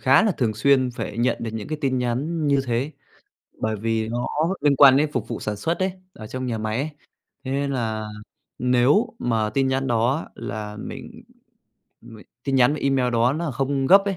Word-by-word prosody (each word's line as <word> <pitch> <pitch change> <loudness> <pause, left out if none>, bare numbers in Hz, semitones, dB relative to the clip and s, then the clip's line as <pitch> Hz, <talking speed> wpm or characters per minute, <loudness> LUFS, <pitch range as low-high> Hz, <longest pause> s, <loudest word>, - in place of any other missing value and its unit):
khá 135 +8 +5
là 215 -3 +2
thường 115 -7 -1
xuyên 130 +3 +3
phải 115 -2 -6
nhận 120 0 +2
được 115 - -3
những 110 -2 -5
cái 155 0 -3
tin 130 -3 +1
nhắn 145 +7 -1
như 140 -1 +3
thế 125 +5 -1 0.7
bởi 110 0 -1
vì 110 +1 -1
nó 120 +2 -2 0.3
liên 145 -1 +3
quan 135 -1 +8
đến 150 +1 +2
phục 115 -3 -2
vụ - - -4
sản 105 -1 -3
xuất 165 +12 -1
ấy, 185 0 0 0.2
ở 110 - -10
trong 130 +3 -4
nhà 115 -2 -2
máy 110 0 -2
ấy, 145 +4 -2 0.5
thế 130 - -4
nên 140 +1 -1
là 110 -4 -2 0.5
nếu 125 - +3
mà 110 -3 0
tin 135 +2 +1
nhắn 135 0 0
đó 120 +5 +1
là 105 0 -6
mình - - -9 0.8
mình 110 -2 -13 0.2
tin 135 - -1
nhắn 125 +1 +5
và 150 - -5
email 135 -2 +2
đó 120 +2 +3
nó 160 +1 -2
không 135 +1 -1
gấp 195 +6 +7
ấy, 195 -2 -1
130 Hz, 210 wpm, -23 LUFS, 115-140 Hz, 0.8 s, quan